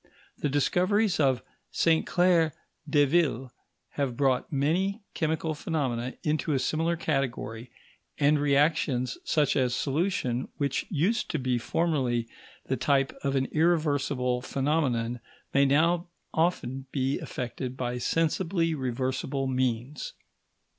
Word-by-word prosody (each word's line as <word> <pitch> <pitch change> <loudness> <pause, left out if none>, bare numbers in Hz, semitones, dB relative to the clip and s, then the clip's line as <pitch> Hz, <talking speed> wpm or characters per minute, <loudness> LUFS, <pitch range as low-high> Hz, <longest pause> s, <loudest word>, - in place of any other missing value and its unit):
The 145 - 0
discoveries 185 +8 +2
of 135 -4 +2 0.3
Sainte 165 -1 +2
Claire 175 -3 +3 0.4
Deville 145 -3 +2 0.4
have 135 -4 -2
brought 135 +1 +1
many 180 +9 0
chemical 160 0 -1
phenomena 130 -6 -2
into 155 0 0
a - - +2
similar 160 +6 0
category, 125 -6 -2 0.5
and 150 +1 +3
reactions 140 -4 +1
such 150 -3 +2
as 125 -2 +2
solution, 135 -5 -1
which 140 -1 -1
used 185 +9 0
to 160 - -1
be 130 -3 0
formerly 125 -5 0 0.4
the 130 - -1
type 135 +1 +1
of 140 -1 0
an 135 -1 +2
irreversible 145 -6 +1
phenomenon, 130 -5 0 0.3
may 140 0 +5
now 165 +5 +3 0.3
often 135 -6 0
be 135 0 0
effected 125 -1 -5
by 125 -1 -2
sensibly 165 +4 +1
reversible 130 0 -2
means. 130 +1 -2
140 Hz, 115 wpm, -28 LUFS, 130-160 Hz, 0.5 s, may